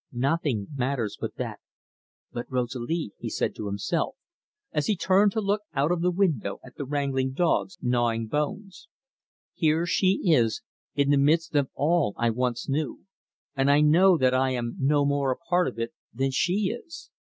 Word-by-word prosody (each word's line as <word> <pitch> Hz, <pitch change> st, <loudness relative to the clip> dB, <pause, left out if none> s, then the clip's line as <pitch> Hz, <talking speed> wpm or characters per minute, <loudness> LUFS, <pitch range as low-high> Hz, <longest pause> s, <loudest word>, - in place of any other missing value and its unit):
"Nothing 130 Hz, -4 st, 0 dB
matters 130 Hz, -5 st, -1 dB
but -, -, -4 dB
that -, -, -5 dB, 0.7 s
but 120 Hz, -, -5 dB
Rosalie," 125 Hz, +2 st, -2 dB
he -, -, -4 dB
said -, -, -1 dB
to 105 Hz, -, -6 dB
himself 155 Hz, -, -2 dB, 0.6 s
as 150 Hz, -, -1 dB
he 215 Hz, -, +2 dB
turned 195 Hz, +3 st, +3 dB
to 220 Hz, -, 0 dB
look 205 Hz, +1 st, 0 dB
out 145 Hz, +4 st, +2 dB
of 175 Hz, -1 st, 0 dB
the 180 Hz, -, +3 dB
window 170 Hz, -, 0 dB
at 125 Hz, -, -14 dB
the 140 Hz, -, -5 dB
wrangling 135 Hz, -2 st, -1 dB
dogs 175 Hz, +4 st, 0 dB
gnawing 120 Hz, -2 st, +1 dB
bones. 190 Hz, -, -4 dB, 0.7 s
"Here 160 Hz, +1 st, +2 dB
she 185 Hz, +2 st, +2 dB
is 115 Hz, -6 st, +2 dB, 0.3 s
in 140 Hz, 0 st, +2 dB
the 145 Hz, -, +4 dB
midst 160 Hz, +4 st, +2 dB
of 140 Hz, -2 st, +2 dB
all 155 Hz, -7 st, +1 dB
I 120 Hz, -1 st, +2 dB
once 125 Hz, 0 st, -2 dB
knew, 145 Hz, +2 st, -2 dB, 0.5 s
and 135 Hz, 0 st, +2 dB
I 145 Hz, +1 st, +5 dB
know 170 Hz, +5 st, +5 dB
that 130 Hz, -3 st, +3 dB
I 130 Hz, +1 st, +2 dB
am 120 Hz, -2 st, -3 dB
no 145 Hz, +1 st, +3 dB
more 140 Hz, -1 st, +1 dB
a 125 Hz, -, -2 dB
part 175 Hz, +1 st, +1 dB
of 125 Hz, -, -5 dB
it 115 Hz, 0 st, -3 dB, 0.2 s
than 135 Hz, +3 st, -1 dB
she 190 Hz, -, +1 dB
is. 330 Hz, +7 st, -11 dB
140 Hz, 175 wpm, -26 LUFS, 125-170 Hz, 0.7 s, I